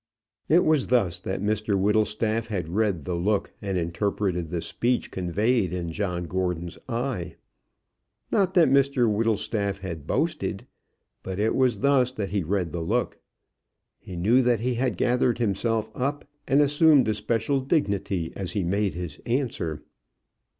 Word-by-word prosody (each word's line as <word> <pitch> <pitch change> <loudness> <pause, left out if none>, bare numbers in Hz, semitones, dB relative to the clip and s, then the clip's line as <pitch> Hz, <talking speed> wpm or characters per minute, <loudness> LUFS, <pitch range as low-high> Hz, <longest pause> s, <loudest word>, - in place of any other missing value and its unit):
It 170 +3 +5
was 155 -4 +3
thus 100 -9 +2
that 95 +1 -4
Mr 105 -1 0
Whittlestaff 110 +2 +1
had 95 -7 -3
read 95 -4 0
the 90 - -2
look 100 +4 0
and 95 -2 -2
interpreted 90 0 -1
the 85 0 -2
speech 120 +8 -1
conveyed 95 +3 0
in 85 -2 -3 0.3
Gordon's 90 -1 -3
eye. 115 -6 -3 1.0
Not 190 -2 +2
that 175 -3 +6
Mr 140 -3 +3
Whittlestaff 105 -2 0
had 85 -6 -6
boasted, - - -1 0.6
but 95 -1 -5
it 110 +2 +1
was 125 -6 +2
thus 135 -2 +3
that 100 -6 -4
he 100 -1 0
read 90 0 -1
the 85 - -3
look. 80 - -1 0.8
He 90 - -9
knew 110 +9 +3
that 120 -3 +2
he 125 +1 0
had 120 -4 -1
gathered 125 +1 +2
himself 115 0 0
up 140 +3 -2 0.2
and 140 +2 +4
assumed 145 -2 +5
a 110 - +2
special 115 +6 0
dignity 100 - -1
as 95 -2 -4
he 100 -3 0
made 100 0 0
his 90 -2 -6
answer. 115 - -2
105 Hz, 150 wpm, -25 LUFS, 90-125 Hz, 1.0 s, that